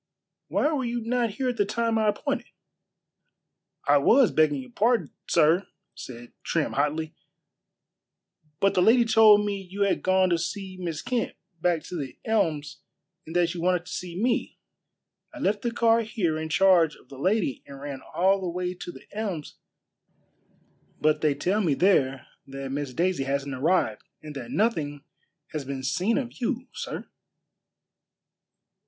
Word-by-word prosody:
"Why 300 - +1
were 275 -3 0
you 240 0 -2
not 235 +1 0
here 260 +4 -2
at 245 - -3
the - - +4
time 225 +2 0
I 215 - +2
appointed?" 275 +5 -1 1.4
"I 145 0 +6
was, 240 - +5
begging 155 -3 +3
your 125 - -15
pardon, 230 - +1 0.2
sir," 165 +4 +3 0.3
said 120 -1 -10
Trim 160 -3 -1
hotly; 155 +3 -1 1.5
"but 195 - +3
the 180 - +3
lady 235 +5 +5
told 215 -2 +6
me 200 -1 -2
you 190 +2 -7
had 200 - +1
gone 185 0 +3
to 170 - +2
see 190 +2 -4
Miss 165 -4 -4
Kent 250 -2 -1 0.3
back 170 -2 +1
to - - -7
The 140 -5 -5
Elms 155 -9 0 0.5
and 165 - -8
that 175 -1 +2
you 175 - -5
wanted 180 0 +1
to 180 - -10
see 180 0 -5
me. 235 +2 0 0.8
I - - -8
left 205 -7 0
the 240 - 0
car 230 0 +3
here 210 -8 -1
in 160 0 -4
charge 175 -3 +4
of - - -22
the 135 - -11
lady 185 - 0
and 140 -1 -10
ran 140 -2 -6
all 190 +2 +3
the 185 - -2
way 180 +1 -2
to 175 -1 -8
The - - -14
Elms; 195 -9 -4 1.4
but 155 0 +2
they 150 -2 +2
tell 185 +9 0
me 160 -8 +2
there 135 -9 +2 0.2
that 135 0 -6
Miss 140 -1 -3
Daisy 175 -5 +1
hasn't 140 0 -2
arrived 130 -5 +1 0.2
and 150 -1 -8
that 125 -4 -7
nothing 155 -10 0 0.5
has 155 -3 -3
been 135 0 -5
seen 180 - +1
of 255 -1 -5
you, 250 +1 -1
sir." - - -6
180 Hz, 165 wpm, -26 LUFS, 150-215 Hz, 1.5 s, I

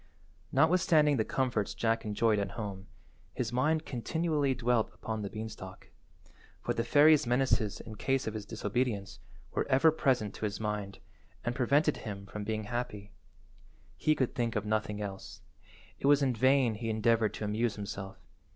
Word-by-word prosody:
Notwithstanding 160 -4 +4
the 110 - +2
comforts 120 -4 -1
Jack 115 -1 0
enjoyed 105 0 +2
at 100 0 -3
home, 100 -3 -5 0.5
his 120 -1 -2
mind 155 +5 +1
continually 145 +2 0
dwelt 120 -2 +1
upon 110 -1 -4
the 100 - -4
beanstalk, 105 -4 -8 0.7
for - - -2
the 115 - -1
fairy's 150 +2 +5
menaces 125 -4 +1
in 110 - -9
case 135 +5 0
of 110 - -3
his 105 -2 -6
disobedience 110 -2 -2 0.3
were - - -1
ever 135 +5 +5
present 130 -9 +1
to - - -4
his 100 -1 -3
mind 105 -2 -3 0.5
and 120 - 0
prevented 140 +4 +2
him 100 -2 -7
from 105 +1 -6
being 110 +1 -2
happy. 105 -3 -4 0.8
He 155 - +2
could 130 -4 0
think 120 -1 -1
of 105 0 -1
nothing 105 -1 -1
else. 95 -1 -7 0.6
It - - 0
was 145 0 +5
in 130 -2 +2
vain 130 0 +3
he 115 +2 -4
endeavoured 110 -1 +2
to - - -5
amuse 110 +2 0
himself. 100 -1 -6
115 Hz, 160 wpm, -31 LUFS, 105-130 Hz, 0.8 s, fairy's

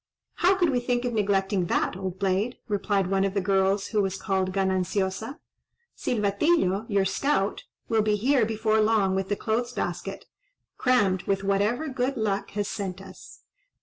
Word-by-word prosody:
"How 370 +3 +4
could 350 -5 +2
we 250 - +1
think 245 0 -1
of 245 - -1
neglecting 195 -3 +1
that, - - 0
old 190 -1 -5
blade!" 195 +5 0
replied 205 -2 0
one 195 +1 +1
of 195 0 -1
the - - +3
girls, 195 +1 +1
who 215 -2 +1
was 195 -1 -1
called 190 -2 0
Gananciosa. 190 - -1 0.6
"Silvatillo, 210 - +1
your 200 -2 +2
scout, 210 -1 0 0.2
will 225 -1 +2
be 210 0 +2
here 250 +4 +2
before 220 0 +1
long 215 -3 +2
with 190 0 -2
the 205 - +1
clothes 235 +4 -2
basket, 175 +1 -4 0.5
crammed 205 -8 +2
with 195 0 0
whatever 205 +9 +1
good 260 0 -1
luck 205 -3 -1
has 205 -1 0
sent 190 -3 -4
us." 190 -1 -13
200 Hz, 165 wpm, -26 LUFS, 195-225 Hz, 0.6 s, How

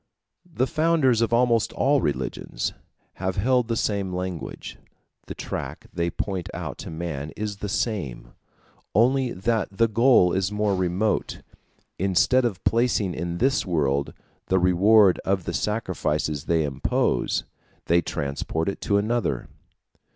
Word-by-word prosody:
The 130 -5 +1
founders 155 -6 +2
of 115 - +1
almost 120 -2 +3
all 140 +1 +2
religions 65 -3 -2 0.5
have 95 0 -1
held 125 +3 +2
the 115 - -1
same 100 -3 -1
language. 90 -2 -5 0.5
The - - -6
track - - -6
they 85 0 0
point 95 -1 -4
out - - -5
to - - -7
man 80 -3 -4
is 105 -1 -3
the 105 - -5
same, 95 - -3 0.6
only 125 +3 +3
that 110 +2 0
the 115 +4 +2
goal 115 -5 +4
is 95 +1 0
more 105 -1 +1
remote; 95 +4 -1 0.6
instead 100 +7 +3
of 105 -7 -3
placing 115 -5 +1
in 85 +1 -3
this 135 +7 +2
world 70 -6 0 0.3
the 95 - +2
reward 95 +2 +5
of 95 -1 -1
the 85 - -4
sacrifices 80 -7 -1
they 80 -2 +2
impose, 70 -3 0 0.4
they 85 +1 +3
transport 75 +3 -2
it 100 - -6
to 100 - +2
another. 105 - -1
95 Hz, 135 wpm, -24 LUFS, 85-115 Hz, 0.6 s, reward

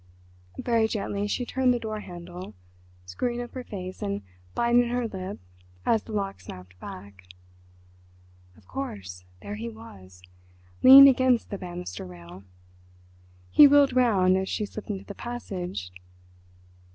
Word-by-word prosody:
Very 230 -2 +1
gently 205 -2 -3
she 245 +4 -2
turned 255 0 +2
the - - -2
door 215 -2 -4
handle, 175 - -9 0.5
screwing 240 - -3
up 240 0 -7
her 255 - -6
face 185 -5 -7
and 100 0 -3 0.3
biting 240 0 +3
her 245 -1 -1
lip 190 -1 -6 0.5
as 225 -2 +3
the - - -12
lock 195 -2 -3
snapped 90 0 -12
back. 95 -1 -11 1.3
Of 100 -4 -22
course, 95 -7 -7 0.2
there 205 +1 -6
he 230 +2 -5
was—leaning 90 - +4
against 255 -2 +3
the 200 - -4
banister 175 - -7
rail. 90 +1 -12 1.1
He 295 - +9
wheeled 280 -2 +5
round 195 -7 +4
as 190 0 -2
she 210 - -2
slipped 210 +1 -9
into 195 -1 -4
the 200 - -8
passage. 185 - -6
195 Hz, 135 wpm, -26 LUFS, -, 1.3 s, He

